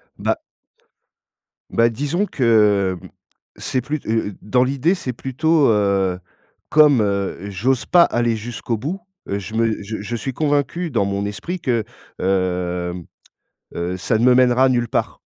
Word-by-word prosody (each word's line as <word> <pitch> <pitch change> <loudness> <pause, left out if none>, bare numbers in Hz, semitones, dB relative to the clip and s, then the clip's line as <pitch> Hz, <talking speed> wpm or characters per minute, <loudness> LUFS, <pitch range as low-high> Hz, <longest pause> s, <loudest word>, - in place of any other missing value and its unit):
Bah - - -1 1.3
bah 115 0 +3
disons 145 - -1
que, 105 - +2
hem, - - -11 0.5
c'est 130 - -2
plut 150 +3 -4
heu 110 -1 0
heu, 105 - -6
dans 125 +4 +2
l'idée, 140 +8 +1
c'est 130 -8 -4
plutôt, 145 +5 +1
heu, 100 -4 +2 0.5
comme, 150 -6 +5
heu, 100 -1 -2
j'ose 115 +7 0
pas 175 -1 +6
aller 120 -4 +1
jusqu'au 115 0 -4
bout, 165 - -4 0.3
heu, 100 - -2
je 110 +3 -8
me 115 -2 0
je 110 +2 -5
je 120 +3 -4
suis 130 +4 -3
convaincu 150 +4 0
dans 115 -6 +1
mon 100 0 -2
esprit 170 - -5
que, 120 -7 0 0.4
hem, 90 -2 -1 0.7
heu, 90 +2 -2
ça 110 +4 0
ne 120 - +1
me 125 -1 +6
mènera 130 +1 +4
nulle 120 -2 +1
part. - - -2
115 Hz, 155 wpm, -20 LUFS, 100-135 Hz, 1.3 s, pas